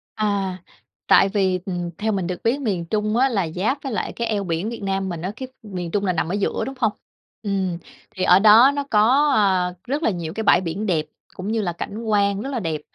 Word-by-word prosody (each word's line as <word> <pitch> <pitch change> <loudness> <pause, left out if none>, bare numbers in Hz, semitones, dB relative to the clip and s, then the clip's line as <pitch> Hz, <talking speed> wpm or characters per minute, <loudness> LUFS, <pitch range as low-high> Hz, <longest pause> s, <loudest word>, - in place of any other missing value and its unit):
À, 200 -3 -1 0.5
tại 195 - +6
vì, 190 -2 +1
ừm, 175 -2 -3
theo 220 +1 -1
mình 190 -4 -1
được 180 - -5
biết 255 +5 +1
miền 190 -9 -1
Trung 215 +4 -1
á 265 +2 +4
là 195 -8 0
giáp 215 - -1
với 270 - -4
lại 210 - -3
cái 235 - -3
eo 205 -2 -1
biển 175 +3 -2
Việt 235 -3 -7
Nam 195 -1 -1
mình 170 -2 -5
á, 185 +3 -3
cái 260 +1 -6 0.2
miền 180 -5 -6
Trung 205 -1 0
là 180 - +1
nằm 160 - -1
ở - - -2
giữa, 205 -1 -1
đúng 270 - -6
hông? 220 -4 +2 0.5
Ừm, 190 -4 -1 0.4
thì 185 - -2
ở 180 - +6
đó 220 +6 +7
nó 285 - -1
có, 260 +8 +4
a, 185 -4 +2
rất 290 +4 -2
là - - +3
nhiều 170 -4 -4
cái 220 - -3
bãi - - +5
biển 185 +4 -3
đẹp 160 -6 0 0.3
cũng 185 - -6
như 225 -1 0
là 175 -4 -2
cảnh 210 +6 -6
quan 200 -2 +1
rất 270 - -4
là 255 -4 -2
đẹp. 160 -5 -3
200 Hz, 245 wpm, -22 LUFS, 180-220 Hz, 0.5 s, đó